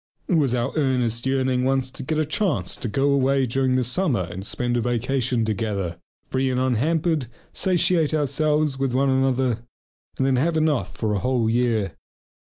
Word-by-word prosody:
It -, -, 0 dB
was 140 Hz, -7 st, +3 dB
our 120 Hz, +2 st, -1 dB
earnest 125 Hz, -4 st, 0 dB
yearning 130 Hz, -1 st, +1 dB
once 130 Hz, 0 st, 0 dB
to 135 Hz, -, -8 dB
get 155 Hz, +4 st, -2 dB
a 155 Hz, -, +1 dB
chance 150 Hz, -, -1 dB
to -, -, -5 dB
go 135 Hz, +6 st, +1 dB
away 135 Hz, 0 st, +2 dB
during 130 Hz, +1 st, +1 dB
the 130 Hz, -, +2 dB
summer 125 Hz, -, 0 dB
and 95 Hz, -, -6 dB
spend 120 Hz, +4 st, -2 dB
a 120 Hz, -, +1 dB
vacation 125 Hz, 0 st, 0 dB
together, 100 Hz, -5 st, -2 dB, 0.3 s
free 130 Hz, 0 st, +1 dB
and 125 Hz, -1 st, 0 dB
unhampered, 150 Hz, +4 st, +1 dB, 0.3 s
satiate 175 Hz, -4 st, +2 dB
ourselves 150 Hz, -1 st, +1 dB
with 135 Hz, -2 st, 0 dB
each -, -, +3 dB
other, 130 Hz, -3 st, +2 dB, 0.6 s
and 130 Hz, -, +1 dB
then 135 Hz, -1 st, +2 dB
have 160 Hz, +5 st, +1 dB
enough 155 Hz, -4 st, 0 dB
for 110 Hz, -2 st, -1 dB
a 100 Hz, -, 0 dB
whole 120 Hz, +2 st, +1 dB
year. 115 Hz, -4 st, +1 dB
130 Hz, 175 wpm, -23 LUFS, 120-140 Hz, 0.6 s, was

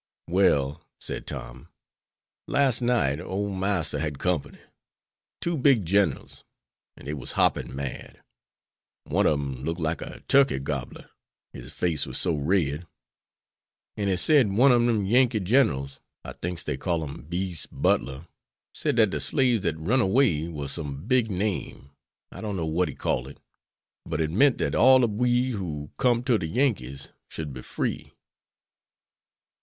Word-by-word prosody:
"Well," 85 Hz, -5 st, +2 dB, 0.2 s
said -, -, -6 dB
Tom, -, -, -7 dB, 0.8 s
"las' 135 Hz, -4 st, +2 dB
night 115 Hz, -, +1 dB
ole 95 Hz, +3 st, -3 dB
Marster 95 Hz, -6 st, -1 dB
had 75 Hz, -2 st, -3 dB
company. 90 Hz, -3 st, -2 dB, 0.8 s
Two 170 Hz, 0 st, -1 dB
big 130 Hz, -, +3 dB
ginerals, 95 Hz, -4 st, 0 dB, 0.5 s
and -, -, -14 dB
dey 75 Hz, -, -3 dB
was 70 Hz, -, -6 dB
hoppin' -, -, +1 dB
mad. 70 Hz, -1 st, -6 dB, 0.8 s
One -, -, +1 dB
ob 75 Hz, -, +3 dB
dem 70 Hz, -2 st, -5 dB
looked 80 Hz, +3 st, -3 dB
like 80 Hz, 0 st, -1 dB
a -, -, -8 dB
turkey 140 Hz, -, +4 dB
gobbler, 70 Hz, -1 st, -5 dB, 0.4 s
his -, -, -10 dB
face 80 Hz, -5 st, -1 dB
war -, -, -6 dB
so 90 Hz, -, +1 dB
red. 75 Hz, +1 st, 0 dB, 1.1 s
An' 100 Hz, -1 st, -2 dB
he 95 Hz, -2 st, +1 dB
sed 135 Hz, -, +5 dB
one 125 Hz, +7 st, +5 dB
ob 120 Hz, -1 st, +4 dB
dem 110 Hz, -4 st, +1 dB
Yankee 120 Hz, +2 st, +3 dB
ginerals, 90 Hz, -, +1 dB, 0.3 s
I -, -, -6 dB
thinks 90 Hz, 0 st, -4 dB
dey -, -, -3 dB
called 80 Hz, -3 st, -1 dB
him 70 Hz, -, -9 dB
Beas' 90 Hz, -1 st, -3 dB
Butler, 65 Hz, +5 st, 0 dB, 0.5 s
sed -, -, -1 dB
dat -, -, +4 dB
de -, -, -2 dB
slaves 125 Hz, -5 st, +2 dB
dat 80 Hz, -5 st, -1 dB
runned 105 Hz, +12 st, +1 dB
away 95 Hz, -, +2 dB
war 75 Hz, -4 st, -5 dB
some 70 Hz, 0 st, -5 dB
big 120 Hz, -1 st, +2 dB
name 95 Hz, -7 st, -3 dB, 0.4 s
I -, -, -9 dB
don't 105 Hz, -3 st, -3 dB
know 85 Hz, -, -2 dB
what 85 Hz, +3 st, 0 dB
he -, -, -7 dB
called 65 Hz, +1 st, -1 dB
it. 70 Hz, -, -12 dB, 0.7 s
But 80 Hz, -1 st, -3 dB
it 80 Hz, -1 st, 0 dB
meant 135 Hz, -, +4 dB
dat -, -, -1 dB
all 130 Hz, +1 st, +6 dB
ob 105 Hz, -3 st, 0 dB
we 125 Hz, +1 st, +2 dB
who 80 Hz, -9 st, -5 dB
com'd 120 Hz, -1 st, +2 dB
to 120 Hz, -5 st, +3 dB
de 80 Hz, -, -3 dB
Yankees 80 Hz, -, -1 dB, 0.2 s
should 75 Hz, -4 st, -6 dB
be 65 Hz, -, -8 dB
free." -, -, -4 dB
90 Hz, 160 wpm, -26 LUFS, 75-115 Hz, 1.1 s, all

